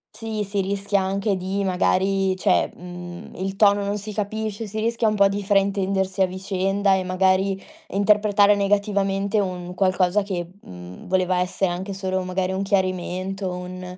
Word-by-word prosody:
sì, 220 Hz, -2 st, -3 dB
si 200 Hz, 0 st, -1 dB
rischia 200 Hz, +1 st, 0 dB
anche 195 Hz, +2 st, 0 dB
di 190 Hz, +2 st, -2 dB
magari, 190 Hz, +1 st, +1 dB
cioè, 185 Hz, 0 st, +2 dB
mhmm, 175 Hz, 0 st, -9 dB
il 190 Hz, +1 st, -3 dB
tono 205 Hz, 0 st, +4 dB
non 200 Hz, +1 st, -1 dB
si 210 Hz, +1 st, -7 dB
capisce, 215 Hz, +1 st, -3 dB
si 215 Hz, +2 st, -5 dB
rischia 230 Hz, +1 st, +1 dB
un 215 Hz, -, +1 dB
po' 200 Hz, -1 st, +5 dB
di 200 Hz, +1 st, -3 dB
fraintendersi 195 Hz, -1 st, +1 dB
a 185 Hz, -, +5 dB
vicenda 195 Hz, +1 st, 0 dB
e 190 Hz, -1 st, +1 dB
magari 190 Hz, +1 st, +1 dB, 0.3 s
interpretare 205 Hz, -1 st, +4 dB
negativamente 200 Hz, 0 st, +1 dB
un 180 Hz, -2 st, -3 dB
qualcosa 185 Hz, +1 st, +2 dB
che, 180 Hz, -4 st, -4 dB
mhmm, 90 Hz, 0 st, -11 dB
voleva 185 Hz, -1 st, +1 dB
essere 180 Hz, +1 st, 0 dB
anche 190 Hz, +3 st, -4 dB
solo 190 Hz, -1 st, -2 dB
magari 185 Hz, 0 st, -1 dB
un 190 Hz, -, -2 dB
chiarimento, 190 Hz, 0 st, -1 dB
un 180 Hz, 0 st, -7 dB
195 Hz, 160 wpm, -23 LUFS, 185-200 Hz, 0.3 s, po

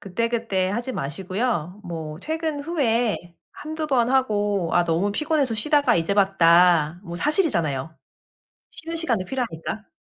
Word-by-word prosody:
그때그때 215 Hz, -2 st, -1 dB
하지 240 Hz, +5 st, -2 dB
마시고요. 185 Hz, -, -3 dB
뭐 160 Hz, -2 st, -6 dB
퇴근 315 Hz, -2 st, -3 dB
후에 245 Hz, -8 st, +1 dB, 0.4 s
1-2 310 Hz, +1 st, -5 dB
번 250 Hz, -4 st, +2 dB
하고 205 Hz, -8 st, +1 dB
"아 175 Hz, 0 st, +4 dB
너무 175 Hz, +5 st, 0 dB
피곤해서 295 Hz, -4 st, 0 dB
쉬다가 285 Hz, -, +2 dB
이제 170 Hz, +4 st, 0 dB
봤다." 175 Hz, -4 st, +4 dB
뭐 170 Hz, -1 st, -6 dB
사실이잖아요, 165 Hz, -, +1 dB, 0.8 s
쉬는 330 Hz, 0 st, -6 dB
시간도 235 Hz, -, 0 dB
필요하니까. 220 Hz, -5 st, -4 dB
210 Hz, 295 characters per minute, -23 LUFS, 175-270 Hz, 0.8 s, 아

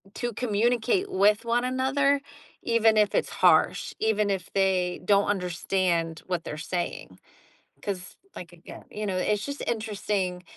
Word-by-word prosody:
to 240 Hz, -1 st, -3 dB
communicate 240 Hz, -, +1 dB
with 210 Hz, +3 st, +3 dB
one 240 Hz, +1 st, +1 dB
another, 275 Hz, +2 st, +1 dB, 0.4 s
even 225 Hz, -1 st, +3 dB
if 210 Hz, -1 st, +3 dB
it's -, -, +1 dB
harsh, -, -, +3 dB
even 210 Hz, -2 st, +1 dB
if 190 Hz, -2 st, -3 dB
they 185 Hz, -2 st, +1 dB
don't 200 Hz, 0 st, +4 dB
understand 180 Hz, -3 st, -1 dB
what 180 Hz, -3 st, -2 dB
they're 150 Hz, -, -6 dB
saying. 175 Hz, +1 st, -4 dB, 0.7 s
'Cause, 185 Hz, -3 st, -5 dB, 0.2 s
like, 175 Hz, -1 st, -9 dB
again, 175 Hz, 0 st, -12 dB
you 210 Hz, 0 st, -4 dB
know, 190 Hz, -, -2 dB
it's 200 Hz, +3 st, 0 dB
just 280 Hz, 0 st, -5 dB
interesting 205 Hz, -5 st, -2 dB
205 Hz, 140 wpm, -26 LUFS, 180-230 Hz, 0.7 s, don't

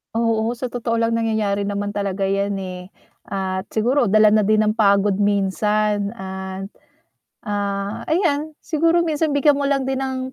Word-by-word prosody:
Oo, 230 Hz, 0 st, +1 dB
sa 245 Hz, +1 st, -4 dB
totoo 230 Hz, -1 st, -2 dB
lang 230 Hz, 0 st, +1 dB
nangyayari 215 Hz, -3 st, 0 dB
naman 205 Hz, 0 st, -3 dB
talaga 195 Hz, -1 st, -1 dB
'yan 200 Hz, 0 st, -1 dB
eh, 180 Hz, -1 st, -7 dB, 0.4 s
at 190 Hz, -1 st, -2 dB
siguro 235 Hz, 0 st, +1 dB
dala 215 Hz, 0 st, +6 dB
na 210 Hz, 0 st, +4 dB
din 215 Hz, +1 st, +3 dB
ng 215 Hz, 0 st, +2 dB
pagod 200 Hz, -2 st, +3 dB
minsan 205 Hz, +1 st, +1 dB
at, 190 Hz, -2 st, -6 dB, 0.8 s
ah, 200 Hz, 0 st, -3 dB
ayan. 315 Hz, -3 st, 0 dB
Siguro 335 Hz, +1 st, +2 dB
minsan 315 Hz, 0 st, 0 dB
bigyan 285 Hz, 0 st, +3 dB
mo 280 Hz, -, 0 dB
lang 275 Hz, -2 st, +1 dB
din 265 Hz, 0 st, -2 dB
ng, 260 Hz, -1 st, -3 dB
215 Hz, 155 wpm, -21 LUFS, 200-260 Hz, 0.8 s, dala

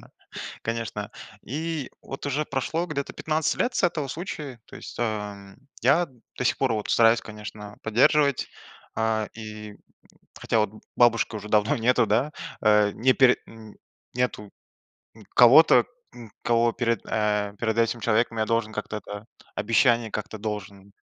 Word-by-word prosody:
да, -, -, -18 dB, 0.5 s
конечно. 115 Hz, -2 st, -4 dB, 0.3 s
И 155 Hz, +1 st, -4 dB
вот 135 Hz, -, -8 dB
уже 145 Hz, +2 st, 0 dB
прошло 155 Hz, +6 st, -2 dB
где-то 140 Hz, -4 st, -4 dB
15 155 Hz, 0 st, 0 dB
лет 245 Hz, -, +1 dB
с -, -, 0 dB
этого 155 Hz, -5 st, 0 dB
случая, 150 Hz, -5 st, -6 dB
то -, -, -14 dB
есть, -, -, -10 dB
а, 105 Hz, -3 st, -4 dB, 0.3 s
я 145 Hz, +8 st, +4 dB, 0.3 s
до -, -, -3 dB
сих -, -, +1 dB
пор 130 Hz, -3 st, +1 dB
вот 105 Hz, -2 st, -3 dB
стараюсь, 115 Hz, 0 st, +5 dB
конечно, 105 Hz, -1 st, -9 dB
поддерживать, 135 Hz, +5 st, +3 dB, 0.5 s
э, 110 Hz, -1 st, 0 dB
и 105 Hz, -1 st, -9 dB, 0.6 s
хотя 115 Hz, -, -1 dB
вот 105 Hz, -2 st, +1 dB, 0.3 s
бабушки 115 Hz, -2 st, +3 dB
уже 105 Hz, 0 st, -8 dB
давно 105 Hz, 0 st, +2 dB
нету, 120 Hz, 0 st, +3 dB
да? 120 Hz, +9 st, +1 dB, 0.3 s
Э, 105 Hz, -1 st, +4 dB
не 130 Hz, +5 st, +3 dB
пер 130 Hz, -2 st, +5 dB
м, 110 Hz, -2 st, -13 dB, 0.4 s
нету, 125 Hz, -4 st, -2 dB, 0.7 s
м, 110 Hz, -2 st, -15 dB
кого-то, 125 Hz, +7 st, +7 dB, 0.3 s
м, 115 Hz, -4 st, -12 dB
кого 115 Hz, 0 st, +3 dB
перед, 115 Hz, 0 st, -1 dB
э, 105 Hz, -1 st, 0 dB
перед 110 Hz, -1 st, -1 dB
этим 115 Hz, +1 st, +1 dB
человеком 115 Hz, +1 st, +1 dB
я 110 Hz, -, +1 dB
должен 115 Hz, -1 st, 0 dB
как-то, 105 Hz, 0 st, -4 dB
да, 105 Hz, +1 st, -8 dB, 0.3 s
обещание 115 Hz, +1 st, +2 dB
как-то 105 Hz, +1 st, -5 dB
должен, 100 Hz, -2 st, -6 dB
115 Hz, 150 wpm, -25 LUFS, 105-125 Hz, 0.7 s, кого-то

